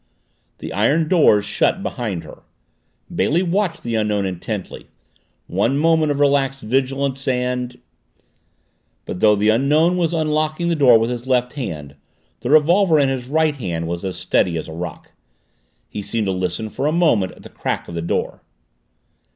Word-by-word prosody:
The -, -, -7 dB
iron 150 Hz, +11 st, +2 dB
doors 150 Hz, -, +4 dB
shut -, -, 0 dB
behind 100 Hz, -9 st, -4 dB
her. 75 Hz, -, -12 dB, 0.7 s
Bailey 170 Hz, +5 st, +1 dB
watched 185 Hz, 0 st, -1 dB
the 120 Hz, -, -3 dB
Unknown 105 Hz, -2 st, 0 dB
intently. 95 Hz, +2 st, -5 dB, 0.6 s
One 115 Hz, +9 st, 0 dB
moment 160 Hz, 0 st, +3 dB
of 145 Hz, -, -2 dB
relaxed 140 Hz, -1 st, +2 dB
vigilance 135 Hz, +3 st, -1 dB
and 125 Hz, -1 st, -1 dB, 1.3 s
But 90 Hz, -, -5 dB
though 105 Hz, -1 st, +5 dB
the 105 Hz, +1 st, +2 dB
Unknown 150 Hz, +10 st, +3 dB
was 170 Hz, -2 st, +1 dB
unlocking 155 Hz, +1 st, 0 dB
the 170 Hz, -, +1 dB
door 130 Hz, -6 st, +6 dB
with 115 Hz, +2 st, 0 dB
his 120 Hz, +1 st, -5 dB
left 125 Hz, -1 st, +1 dB
hand 75 Hz, -, -6 dB, 0.4 s
the 120 Hz, -, -4 dB
revolver 165 Hz, +3 st, +4 dB
in 140 Hz, -2 st, +3 dB
his 130 Hz, -2 st, -3 dB
right 155 Hz, +1 st, +1 dB
hand 85 Hz, -8 st, -3 dB
was 85 Hz, +1 st, -4 dB
as 95 Hz, -2 st, -4 dB
steady 85 Hz, -2 st, +1 dB
as 80 Hz, -, -5 dB
a 80 Hz, -, -8 dB
rock. 85 Hz, 0 st, -7 dB, 0.8 s
He 105 Hz, -, -6 dB
seemed 110 Hz, +2 st, -2 dB
to 95 Hz, -, 0 dB
listen 90 Hz, +3 st, -3 dB
for 140 Hz, -, -2 dB
a -, -, +2 dB
moment 155 Hz, -, +2 dB
at -, -, -17 dB
the -, -, -11 dB
crack -, -, -4 dB
of -, -, -9 dB
the 85 Hz, -, -3 dB
door. 85 Hz, -, -2 dB
125 Hz, 165 wpm, -20 LUFS, 100-150 Hz, 1.3 s, door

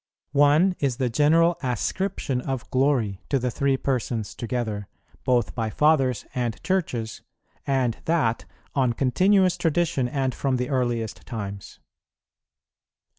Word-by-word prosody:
One 150 Hz, +6 st, +4 dB
is 135 Hz, -4 st, 0 dB
the 130 Hz, -3 st, 0 dB
general 165 Hz, +6 st, +4 dB
ascription 130 Hz, -, -2 dB
of 130 Hz, -2 st, -4 dB
glory 130 Hz, -8 st, +1 dB
to 140 Hz, -, +2 dB
the 125 Hz, -1 st, -1 dB
Three 135 Hz, +2 st, +1 dB
Persons 120 Hz, -5 st, -2 dB
together, 110 Hz, -4 st, -3 dB, 0.4 s
both 120 Hz, -3 st, +1 dB
by 115 Hz, -2 st, -2 dB
fathers 135 Hz, -3 st, +2 dB
and 120 Hz, -3 st, -2 dB
churches, 125 Hz, -12 st, -2 dB, 0.5 s
and 130 Hz, -4 st, +1 dB
that 155 Hz, -9 st, +1 dB, 0.3 s
on 130 Hz, -4 st, +2 dB
continuous 185 Hz, -, +3 dB
tradition 165 Hz, -5 st, +1 dB
and 135 Hz, -1 st, -1 dB
from 135 Hz, 0 st, 0 dB
the 125 Hz, 0 st, -2 dB
earliest 120 Hz, -5 st, -1 dB
times. 100 Hz, -5 st, -6 dB
130 Hz, 125 wpm, -25 LUFS, 120-145 Hz, 0.5 s, One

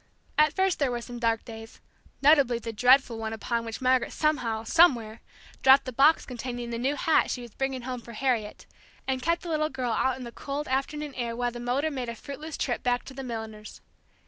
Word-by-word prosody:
At 305 Hz, 0 st, +4 dB
first 380 Hz, 0 st, +1 dB
there 280 Hz, -3 st, +2 dB
were 240 Hz, -1 st, -2 dB
some 240 Hz, 0 st, -8 dB
dark 230 Hz, -1 st, 0 dB
days; 225 Hz, -1 st, -10 dB, 0.4 s
notably 280 Hz, -5 st, +5 dB
the 230 Hz, -1 st, -6 dB
dreadful 250 Hz, 0 st, +4 dB
one 220 Hz, 0 st, -3 dB
upon 230 Hz, +1 st, -2 dB
which 225 Hz, +3 st, -6 dB
Margaret 255 Hz, -1 st, +2 dB
somehow 245 Hz, -8 st, 0 dB
somewhere 235 Hz, -6 st, +3 dB, 0.4 s
dropped 265 Hz, +1 st, +6 dB
the 255 Hz, -, -5 dB
box 290 Hz, +6 st, +4 dB
containing 245 Hz, -1 st, -5 dB
the 230 Hz, -, -3 dB
new 270 Hz, +4 st, 0 dB
hat 320 Hz, +1 st, +2 dB
she 245 Hz, -, -3 dB
was 235 Hz, -3 st, -12 dB
bringing 265 Hz, -2 st, -3 dB
home 250 Hz, -1 st, -5 dB
for 235 Hz, 0 st, -11 dB
Harriet, 230 Hz, -3 st, -1 dB, 0.4 s
and 260 Hz, -1 st, -1 dB
kept 335 Hz, +6 st, 0 dB
the 345 Hz, -, -6 dB
little 310 Hz, -1 st, 0 dB
girl 255 Hz, -4 st, -3 dB
out 260 Hz, +3 st, +1 dB
in 260 Hz, -, -8 dB
the 235 Hz, -, -7 dB
cold 285 Hz, +4 st, -5 dB
afternoon 280 Hz, +2 st, -2 dB
air 235 Hz, -2 st, -3 dB
while 245 Hz, 0 st, -1 dB
the 240 Hz, -, -8 dB
motor 260 Hz, +6 st, 0 dB
made 255 Hz, -4 st, -4 dB
a 235 Hz, -, -5 dB
fruitless 295 Hz, +6 st, -8 dB
trip 245 Hz, -, -1 dB
back 245 Hz, 0 st, 0 dB
to 270 Hz, -, -10 dB
the 270 Hz, -, -7 dB
milliner's. 220 Hz, -4 st, -7 dB
250 Hz, 215 wpm, -27 LUFS, 235-275 Hz, 0.4 s, dropped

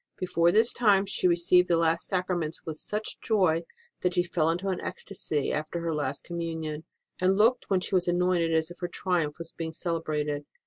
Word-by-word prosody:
Before 170 Hz, -2 st, +2 dB
this 225 Hz, +5 st, +4 dB
time 205 Hz, -4 st, +4 dB
she 195 Hz, -2 st, +1 dB
had -, -, +4 dB
received 175 Hz, +1 st, +4 dB
the 170 Hz, -, +3 dB
last 165 Hz, +1 st, +2 dB
Sacraments 180 Hz, -4 st, -2 dB
with 155 Hz, -1 st, -6 dB
such 210 Hz, +1 st, -3 dB
joy 185 Hz, -7 st, +2 dB, 0.4 s
that 180 Hz, 0 st, 0 dB
she 175 Hz, -, +3 dB
fell 170 Hz, -2 st, 0 dB
into 180 Hz, +4 st, -1 dB
an 185 Hz, -, -2 dB
ecstasy 155 Hz, -7 st, -2 dB
after 155 Hz, +3 st, -3 dB
her 165 Hz, -1 st, -1 dB
last 145 Hz, -2 st, -2 dB
Communion, 160 Hz, -2 st, -4 dB, 0.3 s
and 185 Hz, +1 st, +2 dB
looked 235 Hz, +4 st, +3 dB
when 190 Hz, -2 st, +2 dB
she 195 Hz, -, -4 dB
was 180 Hz, -1 st, +2 dB
anointed 175 Hz, -1 st, +2 dB
as 160 Hz, +1 st, +1 dB
if 175 Hz, -, -12 dB
her 175 Hz, -, -2 dB
triumph 170 Hz, -6 st, -1 dB
was 165 Hz, 0 st, -8 dB
being 160 Hz, -1 st, -5 dB
celebrated. 150 Hz, -3 st, -2 dB
170 Hz, 195 wpm, -28 LUFS, 160-185 Hz, 0.4 s, this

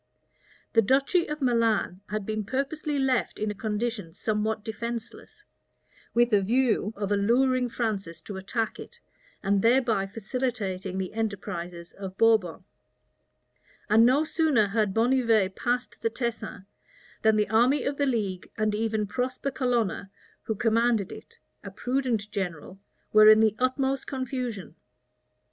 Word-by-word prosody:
The 225 Hz, -, +6 dB
duchy 275 Hz, -, +2 dB
of 300 Hz, -1 st, -4 dB
Milan 230 Hz, -6 st, +1 dB
had 210 Hz, -1 st, -3 dB
been 215 Hz, 0 st, -2 dB
purposely 285 Hz, +6 st, -2 dB
left 265 Hz, -3 st, 0 dB
in 215 Hz, 0 st, -1 dB
a -, -, -4 dB
condition 210 Hz, -4 st, -3 dB
somewhat 215 Hz, 0 st, -1 dB
defenceless, 230 Hz, -, -6 dB, 0.7 s
with 240 Hz, -1 st, +3 dB
a 205 Hz, -, +5 dB
view 225 Hz, 0 st, +1 dB
of 200 Hz, 0 st, -3 dB
alluring 250 Hz, +5 st, +2 dB
Francis 205 Hz, -8 st, -3 dB
to 205 Hz, -, -7 dB
attack 220 Hz, +4 st, -3 dB
it, 475 Hz, -, -11 dB, 0.4 s
and 195 Hz, 0 st, +2 dB
thereby 230 Hz, -4 st, +3 dB
facilitating 200 Hz, -4 st, -3 dB
the 190 Hz, -1 st, -3 dB
enterprises 180 Hz, -5 st, -4 dB
of 190 Hz, -1 st, -8 dB
Bourbon; 220 Hz, -7 st, +3 dB, 1.3 s
and 220 Hz, +2 st, +7 dB
no 260 Hz, +6 st, +4 dB
sooner 310 Hz, -8 st, +2 dB
had 210 Hz, -1 st, +1 dB
Bonnivet 225 Hz, -5 st, +2 dB
passed 245 Hz, +1 st, -2 dB
the 225 Hz, -, +1 dB
Tesin, 225 Hz, -4 st, -4 dB, 0.6 s
than 220 Hz, -1 st, +4 dB
the 210 Hz, -1 st, +2 dB
army 245 Hz, +6 st, +3 dB
of 280 Hz, 0 st, -2 dB
the 285 Hz, -, +1 dB
league, 205 Hz, -8 st, -2 dB
and 215 Hz, -1 st, +1 dB
even 220 Hz, 0 st, 0 dB
Prosper 255 Hz, +5 st, -3 dB
Colonna, 235 Hz, -8 st, -1 dB, 0.4 s
who 220 Hz, -, -1 dB
commanded 225 Hz, -2 st, +1 dB
it, 465 Hz, -, -12 dB, 0.3 s
a -, -, -6 dB
prudent 245 Hz, -5 st, -2 dB
general, 185 Hz, -1 st, -5 dB, 0.3 s
were 215 Hz, 0 st, +8 dB
in 215 Hz, 0 st, +8 dB
the 220 Hz, -1 st, +3 dB
utmost 265 Hz, +1 st, 0 dB
confusion. 250 Hz, -, -4 dB
225 Hz, 135 wpm, -27 LUFS, 205-250 Hz, 1.3 s, were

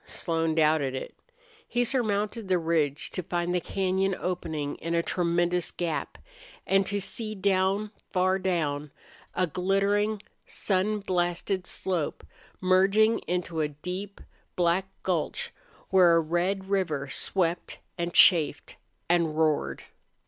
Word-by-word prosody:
Slone 165 Hz, -2 st, -1 dB
doubted 155 Hz, -4 st, +2 dB
it. 130 Hz, -, -6 dB, 0.5 s
He 245 Hz, 0 st, +1 dB
surmounted 220 Hz, -3 st, -1 dB
the 185 Hz, -1 st, +3 dB
ridge, 160 Hz, -4 st, 0 dB
to 185 Hz, -, -3 dB
find 175 Hz, 0 st, -2 dB
the 180 Hz, -, +1 dB
cañon 190 Hz, 0 st, 0 dB
opening 160 Hz, -5 st, -3 dB
in 165 Hz, +1 st, -3 dB
a 170 Hz, -, +2 dB
tremendous 175 Hz, 0 st, +1 dB
gap, 170 Hz, -3 st, -3 dB, 0.5 s
and 195 Hz, 0 st, +3 dB
to 200 Hz, 0 st, 0 dB
see 215 Hz, +2 st, -2 dB
down, 195 Hz, +1 st, +1 dB, 0.2 s
far 185 Hz, 0 st, +2 dB
down, 155 Hz, -6 st, -1 dB, 0.5 s
a 185 Hz, -, +2 dB
glittering, 200 Hz, +5 st, +1 dB, 0.3 s
sun 205 Hz, +2 st, 0 dB
blasted 180 Hz, 0 st, -1 dB
slope 175 Hz, -6 st, -2 dB, 0.3 s
merging 195 Hz, +4 st, +4 dB
into 175 Hz, -2 st, -1 dB
a 150 Hz, -, +1 dB
deep, 180 Hz, +7 st, -6 dB, 0.4 s
black 175 Hz, +2 st, +2 dB, 0.2 s
gulch 175 Hz, -4 st, -2 dB, 0.4 s
where 180 Hz, -3 st, +6 dB
a -, -, +5 dB
red 175 Hz, +4 st, -1 dB
river 170 Hz, -8 st, 0 dB
swept 170 Hz, +4 st, -1 dB, 0.2 s
and 170 Hz, -1 st, -2 dB
chafed 160 Hz, -5 st, +4 dB, 0.3 s
and 165 Hz, -3 st, +1 dB
roared. 150 Hz, -, +1 dB
180 Hz, 125 wpm, -27 LUFS, 165-195 Hz, 0.5 s, where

